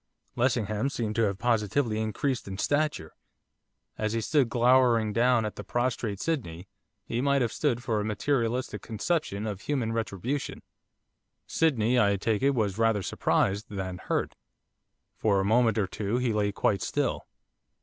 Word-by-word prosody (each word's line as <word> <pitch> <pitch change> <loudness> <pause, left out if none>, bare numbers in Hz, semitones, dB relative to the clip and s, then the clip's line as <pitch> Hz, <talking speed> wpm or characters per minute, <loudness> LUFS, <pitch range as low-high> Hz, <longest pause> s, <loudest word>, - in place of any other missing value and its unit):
Lessingham 120 -1 0
seemed 115 -5 -3
to - - +3
have 100 -2 -1
positively 115 +1 +1
increased 120 +4 -2
in 95 0 -5
stature. 145 - -1 0.9
As 110 0 -1
he 115 - 0
stood 135 +1 +2
glowering 120 -3 +3
down 120 0 +3
at 105 - -5
the 105 - -6
prostrate 115 -1 -2
Sydney, 100 - -3 0.4
he 115 +1 -2
might 140 -1 +2
have 115 - -1
stood 125 -5 0
for 110 -4 0
a - - -1
materialistic 120 +3 -1
conception 115 - -2
of 105 -3 -4
human 125 -6 -1
retribution. 115 +5 -3 0.8
Sydney, 125 -6 +2
I 100 -2 +3
take 105 +2 0
it, 140 0 +3
was 105 -3 -1
rather 115 -3 +2
surprised 100 +3 0
than 95 -3 -5
hurt. - - -2 0.8
For 100 -3 +2
a 95 - 0
moment 115 +2 +3
or 105 - +2
two 105 +4 -2
he 125 -3 0
lay 105 -1 +1
quite 100 -1 0
still. - - -1
115 Hz, 155 wpm, -28 LUFS, 105-125 Hz, 0.9 s, to